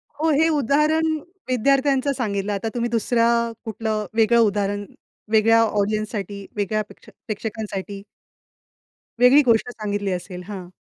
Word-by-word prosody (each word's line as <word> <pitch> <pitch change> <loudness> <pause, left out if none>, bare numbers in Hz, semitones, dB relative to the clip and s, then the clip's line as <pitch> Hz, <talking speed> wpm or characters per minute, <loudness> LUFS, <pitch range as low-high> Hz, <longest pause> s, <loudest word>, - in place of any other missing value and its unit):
हो, 315 +2 0
हे 310 +2 +3
उदाहरण 300 +2 +2 0.4
विद्यार्थ्यांचं 270 +2 +2
सांगितलं. 205 -4 -2
आता 200 +3 -2
तुम्ही 240 0 -1
दुसरं 235 0 +1
कुठलं 220 -1 -2
वेगळं 230 +1 +4
उदाहरण 205 -2 +1 0.5
वेगळ्या 225 +1 +5
ऑडियन्ससाठी, 210 -1 -2
वेगळ्या 210 +1 -1
प्रेक्ष 210 - -17 0.2
प्रेक्षकांसाठी 210 -2 -5 1.2
वेगळी 250 +4 +7
गोष्ट 230 +1 +3
सांगितली 205 -3 -3
असेल? 180 0 -5
हां. 190 -4 -7
220 Hz, 115 wpm, -22 LUFS, 205-245 Hz, 1.2 s, वेगळी